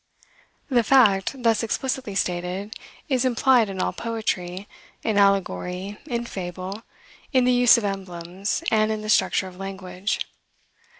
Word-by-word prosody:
The 250 -4 +3
fact, 235 0 +3
thus 225 -2 +3
explicitly 255 -1 -2
stated, 180 +3 -2 0.3
is 260 -4 +1
implied 250 -2 +3
in 190 -1 -6
all - - 0
poetry, 205 -5 -3 0.4
in 215 -2 +1
allegory, 195 - 0
in 240 -3 -2
fable, 185 0 -6 0.5
in 255 -2 +4
the 250 - +4
use 245 -1 +6
of 235 - -2
emblems, 190 - -3
and 215 -1 +3
in 215 -1 -3
the 215 - -5
structure 190 - +2
of 180 -1 -12
language. 190 0 -4
205 Hz, 135 wpm, -24 LUFS, 185-235 Hz, 0.5 s, use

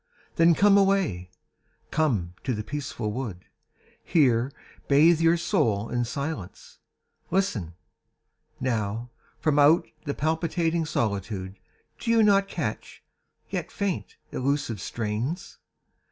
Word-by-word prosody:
Then 165 0 +5
come 200 +2 +6
away, 190 - +1 0.6
come 115 - 0
to 130 -3 -1
the 105 - -4
peaceful 130 -5 -4
wood, 105 -7 -5 0.6
Here 130 -5 +3 0.4
bathe 155 +4 +5
your 165 +1 +4
soul 115 - +1
in 120 0 0
silence. 120 - -6 0.5
Listen! 120 - -1 0.8
Now, 115 -1 -2 0.3
From 150 -2 +1
out 150 +4 +5 0.2
the 140 - -2
palpitating 165 +1 0
solitude 100 - -2 0.4
Do - - -4
you 230 -1 +5
not 200 -1 +4
catch, - - -5 0.5
yet - - -3
faint, 200 -4 -3 0.2
elusive 130 -6 -1
strains? 120 - -3
140 Hz, 110 wpm, -26 LUFS, 110-165 Hz, 0.8 s, come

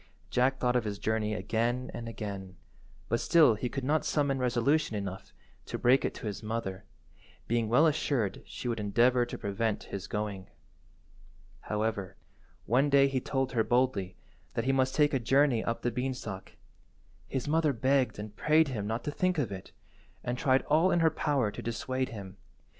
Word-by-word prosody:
Jack 130 +2 +2
thought 125 -1 +1
of 125 - +2
his 105 -2 -4
journey 110 +1 -1
again 115 +5 -1
and 115 -1 -6
again, 100 -5 -6 0.5
but 115 - 0
still 160 -8 +5
he 115 +4 -3
could 135 +1 -4
not 150 +4 +1
summon 140 -3 0
resolution 125 +2 +1
enough 95 -2 -5 0.4
to - - -3
break 125 +3 +4
it - - -2
to - - -8
his 105 -2 -4
mother, 105 -3 -4 0.6
being 115 -1 0
well 125 +8 +5
assured 140 -9 0
she - - -6
would 115 -2 -1
endeavour 120 +4 +3
to - - -6
prevent 105 +2 -2
his 100 -2 -4
going. 100 -3 -4 1.1
However, 105 -3 -2 0.5
one 130 +6 +3
day 140 -1 +5
he 130 -1 -1
told 135 0 -1
her 115 -3 +2
boldly 120 -7 0 0.4
that - - -1
he 135 - +3
must 130 -1 +1
take 150 0 +3
a 135 - +2
journey 135 -1 +3
up 115 - -3
the 120 - +1
beanstalk. 125 -6 -4 0.7
His 130 -1 -3
mother 155 0 +2
begged 130 +1 +1
and 105 0 -7
prayed 155 +4 +3
him 105 -6 -3
not 115 +3 -2
to 150 - -2
think 185 +3 0
of 125 -9 -1
it, 95 -2 -8 0.5
and 125 0 -2
tried 130 +1 +2
all 160 +5 +3
in 175 - +2
her 160 -1 +4
power 140 -8 0
to - - -7
dissuade 130 +2 -2
him. 100 -3 -9
120 Hz, 180 wpm, -30 LUFS, 105-135 Hz, 1.1 s, still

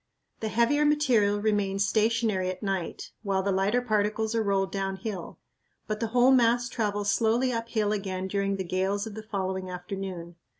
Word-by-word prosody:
The 220 - -2
heavier 235 +7 +2
material 250 -9 +3
remains 205 -2 +1
stationary 215 -3 +1
at 185 +3 -6
night 195 -4 -3
while 195 -3 0
the 200 - +1
lighter 200 +6 +1
particles 215 0 0
are 225 - +1
rolled 195 -2 0
downhill, 195 -1 -4 0.5
but 215 0 -3
the 230 - -1
whole 245 +3 +4
mass 240 -1 +4
travels 205 -3 -1
slowly 235 +4 +2
uphill 230 -2 -1
again 190 -2 -2
during 200 0 0
the 190 - -3
gales 190 +3 -1
of 220 - -7
the 220 - -6
following 190 -3 -3
afternoon. 180 -2 -6
205 Hz, 165 wpm, -27 LUFS, 195-230 Hz, 0.5 s, whole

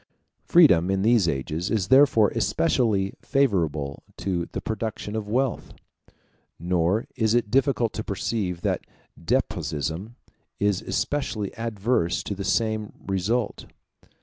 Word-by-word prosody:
Freedom, 95 - +5
in 95 0 +1
these 115 -4 +4
ages, 75 +4 -2
is 105 -4 0
therefore 130 -6 +6
especially 105 - +1
favorable 80 - 0 0.2
to 90 -3 -2
the - - -3
production 110 -1 -4
of 105 -2 -4
wealth; 130 +1 -1 0.8
nor 90 +5 0
is 110 0 +2
it 115 -4 0
difficult 130 -3 +2
to 110 - -4
perceive 100 -4 -2
that - - 0 0.4
despotism 80 - -2 0.4
is 100 -2 +1
especially 115 -8 -2
adverse 115 -5 -1
to - - -3
the 100 0 -5
same 110 0 0
result. 100 +5 -1
105 Hz, 120 wpm, -25 LUFS, 90-115 Hz, 0.8 s, therefore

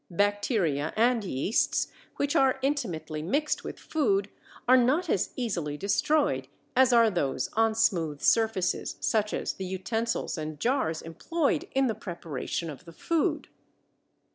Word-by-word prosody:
Bacteria 200 - 0
and 235 0 +3
yeasts, 185 - 0 0.3
which 285 0 -1
are 265 -1 +4
intimately 175 - -2
mixed 285 - 0
with - - -6
food, 205 -10 0 0.4
are 255 - +7
not 280 +7 +3
as 190 - +1
easily 170 - -2
destroyed 200 - +1 0.3
as 260 0 +5
are 230 -2 +5
those 145 -8 -1
on 225 0 +2
smooth 170 -10 +1
surfaces, 220 -3 +1
such 215 -1 +1
as - - -2
the 190 - -6
utensils 225 +1 -2
and 155 -1 -5
jars 240 - 0
employed 290 - -1
in 270 0 +4
the 230 - +1
preparation 170 - -5
of 150 +2 -9
the 165 - -12
food. 330 - 0
210 Hz, 140 wpm, -28 LUFS, 165-255 Hz, 0.4 s, are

